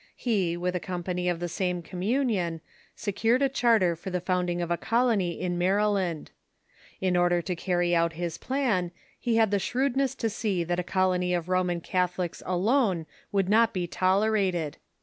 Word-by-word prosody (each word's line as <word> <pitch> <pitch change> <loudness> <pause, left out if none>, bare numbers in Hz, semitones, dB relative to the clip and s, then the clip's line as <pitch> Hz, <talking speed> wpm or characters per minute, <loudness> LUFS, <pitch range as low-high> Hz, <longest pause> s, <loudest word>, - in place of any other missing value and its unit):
He, 190 -8 0
with 180 +1 -1
a - - 0
company 180 0 -3
of 175 -2 -1
the 175 - -2
same 180 0 -2
communion, 185 - -1 0.3
secured 225 +6 +1
a 275 - +3
charter 225 -9 +3
for 175 +4 -7
the 180 -1 -1
founding 180 -1 -1
of 175 -1 -2
a - - +3
colony 220 -5 +1
in 175 -1 -2
Maryland. 190 -3 +1 0.7
In 185 -1 +1
order 175 0 +3
to 180 - -2
carry 175 0 +1
out 165 0 +2
his 170 0 -4
plan, 245 -10 0 0.3
he 235 -2 0
had 220 -2 +3
the 200 - +2
shrewdness 265 +5 0
to 230 - -1
see 200 -4 -1
that 175 +1 -1
a - - -1
colony 180 -1 +1
of 175 0 -3
Roman 180 -2 +1
Catholics 180 -1 -1
alone 190 - +1 0.3
would 195 -2 +1
not 225 +3 +4
be 180 -3 -1
tolerated. 185 -4 +1
185 Hz, 170 wpm, -27 LUFS, 175-215 Hz, 0.7 s, not